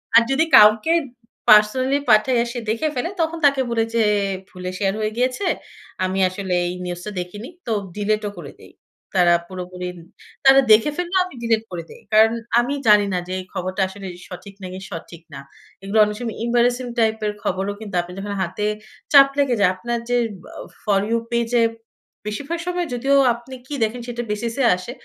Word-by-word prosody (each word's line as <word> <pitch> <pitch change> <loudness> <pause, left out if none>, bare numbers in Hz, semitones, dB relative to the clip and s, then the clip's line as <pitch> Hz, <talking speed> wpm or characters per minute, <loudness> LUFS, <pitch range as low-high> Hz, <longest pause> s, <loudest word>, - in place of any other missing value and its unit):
আর 235 - +9
যদি 280 +4 +3
কাউকে 215 +8 +6 0.6
পার্সোনালি 255 +6 +5
পাঠাই, 215 +4 +4
আর - - -5
সে 240 - -3
দেখে 230 +8 0
ফেলে, 260 +8 -1
তখন 325 +1 -1
তাকে 275 -2 +4
বলি 230 -1 +1
যে, 230 - +3 0.5
"ভুলে 180 0 -7
শেয়ার 195 -1 0
হয়ে 215 0 -1
গিয়েছে। 255 +10 0 0.6
আমি 185 +1 -1
আসলে 185 0 -4
এই 175 - -3
নিউজ 175 -1 -4
টা 210 - -5
দেখিনি।" 205 +6 -7 0.2
তো 230 - -3 0.2
ডিলিটও 210 0 -1
করে 145 -5 -8
দেই। - - -15 0.5
তারা 175 -1 +5
পুরোপুরি, 180 0 -7 0.6
তারা 270 0 +8
দেখে 220 +7 +6
ফেললেও 355 +1 0
আমি 365 - -11
ডিলিট 225 -1 +1
করে 170 -2 -5
দেই। - - -13
কারণ 220 +1 +6 0.3
আমি 245 +4 0
জানি 210 -1 +6
না, - - +1
যে - - -7
এই - - -6
খবরটা 185 +2 -3
আসলে 195 0 -9 0.2
সঠিক, 185 +2 -10
নাকি 185 0 -6
সঠিক 165 0 -8
না। - - -7 0.4
এইগুলো 195 +3 -2
অনেক 210 0 -4
সময় 235 -3 -5
এম্বারাসিং 245 +1 +1
টাইপের 220 -2 +1
খবরও 195 +2 -1
কিন্তু 215 -3 -7
আপনি 175 +1 -10
যখন 200 +1 -4
হাতে 190 +3 -2 0.5
চাপ 275 -1 +9
লেগে 270 -4 +2
যায়। 200 - +5
আপনার 235 +5 -3
যে 245 - +2 0.4
আ - - -8 0.2
ফর 200 -2 +2
ইউ 230 - +2
পেইজে 235 0 +1 0.7
বেশিরভাগ 285 +10 -4
সময় 355 -1 -1
যদিও 270 +3 +1 0.2
আপনি 240 +3 -10
কি 295 - -7
দেখেন 230 +3 -2
সেটার 240 0 -4
বেসিসে 230 +5 -2
আসে। 185 +6 -8
220 Hz, 180 wpm, -21 LUFS, 195-245 Hz, 0.7 s, আর